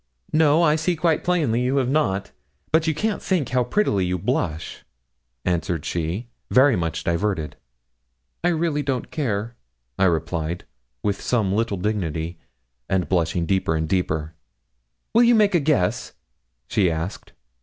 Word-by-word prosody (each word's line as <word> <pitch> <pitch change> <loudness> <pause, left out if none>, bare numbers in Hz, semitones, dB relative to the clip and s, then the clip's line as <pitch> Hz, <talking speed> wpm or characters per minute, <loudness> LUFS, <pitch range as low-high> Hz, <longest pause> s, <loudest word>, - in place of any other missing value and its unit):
'No, 155 +1 +4
I 155 -1 +4
see 170 +2 0
quite 160 0 +1
plainly 150 -10 +1
you 130 +3 +1
have 130 -2 +2
not; 130 -9 0 0.4
but 160 +1 +3
you 160 - +1
can't 215 +4 -1
think 175 -10 0
how 125 0 +2
prettily 120 - +1
you 90 0 0
blush,' 80 -2 -2 0.6
answered 85 -3 -1
she, 85 +8 -2 0.2
very 130 0 +5
much 80 -2 -2
diverted. 85 -2 -1 0.9
'I - - +3
really 160 -3 0
don't 135 -3 -2
care,' 115 -6 -2 0.4
I 95 - +5
replied, 85 -1 -1 0.4
with 100 -1 -1
some 105 -6 +1
little 110 -1 0
dignity, 85 -5 -2 0.5
and 90 -4 +1
blushing 85 -1 +1
deeper 95 -3 +1
and 80 0 -1
deeper. 80 -3 -1 0.8
'Will 230 - +6
you 240 0 +6
make 210 -2 +4
a 175 - +4
guess?' 120 - 0 0.5
she 95 -4 +2
asked. 80 +3 -5
105 Hz, 145 wpm, -23 LUFS, -, 0.9 s, Will